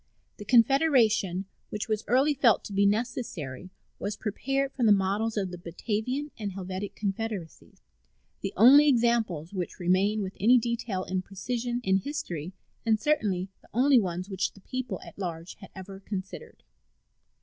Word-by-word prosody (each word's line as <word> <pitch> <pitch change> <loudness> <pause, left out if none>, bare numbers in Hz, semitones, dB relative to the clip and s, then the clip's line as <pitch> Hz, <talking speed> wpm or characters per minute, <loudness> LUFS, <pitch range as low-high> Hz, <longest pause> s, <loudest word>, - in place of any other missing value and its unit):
The 205 - -9
Confederation 230 - +3 0.2
which 210 - -4
was 215 -1 -1
early 265 +6 +3
felt 255 -6 +3
to 205 - -8
be 200 +1 +4
necessary 200 - -3 0.3
was 205 0 -3
prepared 270 +6 -1
from 245 -4 +1
the - - +6
models 205 +3 +1
of 190 -3 -1
the 180 - -7
Batavian 220 - -3
and 205 -3 -4
Helvetic 190 +1 -5
confederacies, 205 -4 -5 0.6
the 195 - -3
only 275 +7 +8
examples 230 - +1
which 180 -3 -4
remain 195 +4 +2
with 190 0 -5
any 240 +5 +6
detail 230 -5 -2
and 185 0 -2
precision 240 +5 -3
in 190 -2 +3
history, 180 - -4 0.3
and 220 -2 +2
certainly 205 -10 0
the - - -23
only 260 +1 +5
ones 180 -2 -3
which 190 -2 -2
the 195 - -17
people 255 +5 -4
at - - -13
large 170 -2 -5
had 195 - -12
ever 190 0 -9
considered. 195 - -7
205 Hz, 155 wpm, -28 LUFS, 190-240 Hz, 0.6 s, only